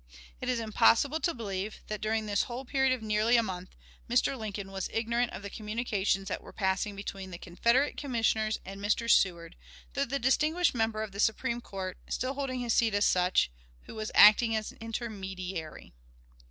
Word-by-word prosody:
It 255 - -3
is 250 -2 +1
impossible 230 +6 +3
to 340 - +1
believe 210 - -5
that, 215 -1 -5
during 220 0 0
this 205 -1 +1
whole 250 +3 -5
period 265 0 +2
of 255 -3 -1
nearly 215 +3 +3
a 230 - +3
month, 185 -3 -6 0.3
Mr. 245 +3 +2
Lincoln 205 -4 -6
was 195 -1 -3
ignorant 235 +2 0
of 195 - -8
the 200 - -5
communications 210 -3 -1
that 195 - -3
were - - -12
passing 190 +1 -1
between 195 -1 -6
the 175 - -7
Confederate 235 +11 +1
Commissioners 225 -5 0
and 195 +1 -8
Mr. 210 +3 0
Seward, 170 -6 +2 0.4
through 280 - 0
the 275 +3 -1
distinguished 305 +7 +2
member 225 -2 0
of 215 - -6
the 200 - -9
Supreme 235 +3 +1
Court 190 -4 -6
still 255 +2 -1
holding 265 -2 -3
his 235 -2 0
seat 225 -3 +3
as 205 - +3
such 180 - +3 0.3
who - - -11
was 220 -1 -4
acting 220 +2 +7
as 215 -1 -2
intermediary. 190 - -6
220 Hz, 180 wpm, -30 LUFS, 195-240 Hz, 0.4 s, acting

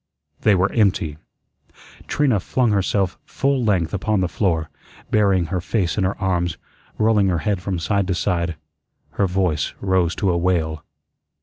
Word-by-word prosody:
They 105 - +4
were 95 +2 +2
empty. 95 -8 +1 0.9
Trina 135 -8 +2
flung 120 +5 +1
herself 100 -2 0
full 135 -2 0
length 95 -6 +1
upon 100 0 0
the 90 - +1
floor, 85 -4 -1 0.4
burying 100 -4 +3
her 90 - 0
face 90 -1 -1
in 105 - 0
her 95 - -1
arms, 90 -3 0 0.4
rolling 110 -2 +3
her 90 -2 +1
head 100 -4 0
from 95 0 -2
side 100 +3 0
to 90 - 0
side. 85 -1 -1 0.6
Her 100 - +1
voice 90 -5 0
rose 95 -3 +1
to 95 - +1
a 85 - +1
wail. 80 -4 0
95 Hz, 160 wpm, -21 LUFS, 85-105 Hz, 0.9 s, They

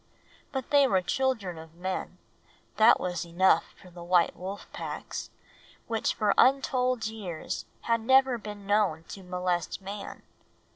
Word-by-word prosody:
But 265 -3 -4
they 285 -1 +6
were 190 -6 +2
children 215 -7 -1
of 160 0 -13
men 185 +2 -4 0.6
that 220 +2 +7
was 180 0 -2
enough 170 0 +2
for 180 - -15
the 175 0 -10
white 175 0 +3
wolf 190 +3 -6
packs, - - -6 0.6
which 225 -1 -1
for 210 -2 +2
untold 255 -2 +3
years 205 -7 -5 0.2
had 230 -1 +1
never 260 +1 +4
been 205 -2 -8
known 200 -6 +2
to 195 - -8
molest 180 -2 -2
a - - -24
man. 200 +1 -7
200 Hz, 145 wpm, -28 LUFS, 180-235 Hz, 0.6 s, that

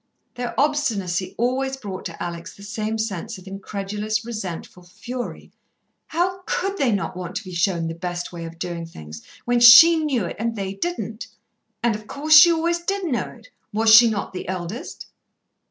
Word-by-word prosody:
Their 245 0 -4
obstinacy 220 -12 0
always 265 +3 -1
brought 200 -7 -7
to 170 - -7
Alex 170 -1 -7
the 200 - -13
same 215 +1 -3
sense 220 0 -4
of 185 - -14
incredulous, 205 +2 -4
resentful 190 -6 -6
fury. 240 +8 -7 0.6
How 370 +3 -1
could 390 +1 -2
they 265 -4 +2
not 200 -3 -2
want 180 0 -6
to - - -3
be 185 -2 -9
shown 170 -1 0
the 165 - -4
best 175 +1 -5
way 170 -1 -6
of 165 0 -9
doing 170 -1 -5
things, 80 - -11 0.2
when 245 0 +2
she 250 +8 +10
knew 260 -10 0
it 170 - -6
and 230 +1 -2
they 195 -2 -4
didn't? 225 - -4 0.6
And, 235 -1 +3
of 210 0 -9
course, 305 +2 0
she 315 +3 +10
always 335 +1 0
did 390 +3 -2
know 245 - -1
it. - - -16 0.2
Was 220 +1 +4
she 230 +1 +9
not 205 -3 -3
the 180 - -6
eldest? 185 +5 -6
215 Hz, 180 wpm, -22 LUFS, 180-255 Hz, 0.6 s, she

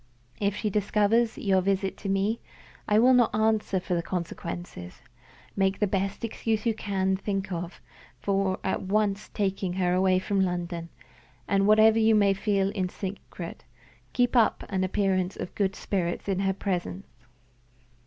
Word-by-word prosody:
If 200 -1 0
she 210 0 -2
discovers 210 +3 +2
your 190 -2 +2
visit 195 0 0
to 200 - -5
me, 195 +4 +1 0.5
I 210 - +3
will 250 +4 +6
not 240 -4 +4
answer 215 -3 +1
for 180 - -3
the 170 - +1
consequences. 170 - -6 0.5
Make 195 0 +1
the 210 - +2
best 195 +2 -2
excuse 225 0 -2
you 230 - +3
can 190 -3 -1
think 195 0 -3
of 175 0 -5 0.4
for 195 -1 0
at 190 - -1
once 205 +1 0
taking 195 -3 -1
her 180 -1 +1
away 185 0 +3
from 195 +1 0
London, 175 -2 -2 0.6
and, 195 0 +2
whatever 220 +1 +6
you 220 0 +4
may 200 -2 +4
feel 195 -1 0
in 185 -3 -2
secret, 185 -3 -7 0.5
keep 245 +1 +1
up 230 -3 +3
an 190 -2 0
appearance 185 -1 0
of - - -6
good 195 -2 0
spirits 175 -2 -2
in 195 -2 0
her 195 0 +1
presence." 190 0 -3
195 Hz, 155 wpm, -27 LUFS, 185-210 Hz, 0.6 s, will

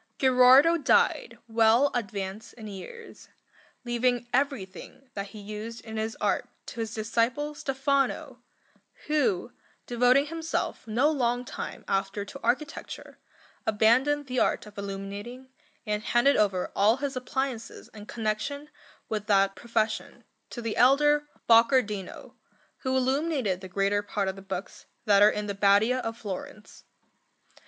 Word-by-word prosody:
Gherardo 260 +5 +6
died 280 - +2
well 230 +4 +4
advanced 205 -1 -4
in 220 - -11
years, 215 - -10 0.6
leaving 240 0 0
everything 265 -1 -3
that 200 -2 -4
he 210 +2 -11
used 215 +3 -7
in 220 -1 -7
his 220 +1 -3
art - - 0 0.2
to 240 - -9
his 225 -2 -3
disciple 235 +7 -1
Stefano, 275 -1 -1 0.7
who, 255 -8 0 0.3
devoting 250 +3 +3
himself 325 -6 -3
no 250 +8 +2
long 245 -3 0
time - - -7
after 195 +1 -1
to 275 +7 -10
architecture, 295 +5 -3 0.5
abandoned 250 +7 +3
the 255 -1 -2
art - - +1
of 210 0 -14
illuminating, 200 +6 -7 0.4
and 210 -1 -1
handed 240 +6 +3
over 195 -4 +1
all 215 +4 +4
his 280 0 -3
appliances 255 -2 -4
in 210 -1 -11
connection 240 +7 -3 0.4
with 210 -1 -4
that 195 -1 +3
profession 225 -2 -2 0.3
to 240 - -7
the 225 -1 -3
elder 295 +4 +4 0.2
Boccardino, 230 -4 +2 0.4
who 260 -1 -1
illuminated 260 - 0
the 190 - -9
greater 200 +2 +1
part 205 -1 -2
of 190 - -2
the 195 - -11
books 195 - -7 0.2
that 200 -1 +5
are 205 - +8
in 210 0 -3
the 205 - -3
Badia 205 +5 +3
of 225 -2 -4
Florence. 210 0 -8
230 Hz, 135 wpm, -27 LUFS, 205-265 Hz, 0.7 s, are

